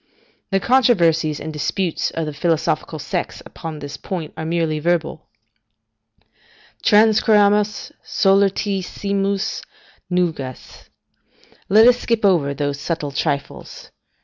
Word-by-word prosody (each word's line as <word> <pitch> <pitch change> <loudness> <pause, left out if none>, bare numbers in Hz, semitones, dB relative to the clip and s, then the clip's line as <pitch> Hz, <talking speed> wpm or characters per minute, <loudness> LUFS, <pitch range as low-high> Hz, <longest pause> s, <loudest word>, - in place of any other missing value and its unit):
The 195 - +1
controversies 170 - +2
and 155 - -6
disputes 170 +4 -1
of 165 - -3
the 150 - -5
philosophical 160 0 -1
sects 175 +4 -4
upon 165 -3 -8
this 145 -1 -8
point 170 -5 -6
are 160 - -6
merely 160 -1 -1
verbal: 165 -1 -1 1.5
"Transcurramus 210 -1 +3
solertissimas 200 +1 0 0.5
nugas" 160 -8 -3 0.8
["Let 215 +3 +6
us 245 0 +5
skip 230 -3 0
over 155 -8 +2
those 145 0 -2
subtle 155 -2 -3
trifles." 140 0 -4
175 Hz, 100 wpm, -20 LUFS, 155-200 Hz, 1.5 s, Let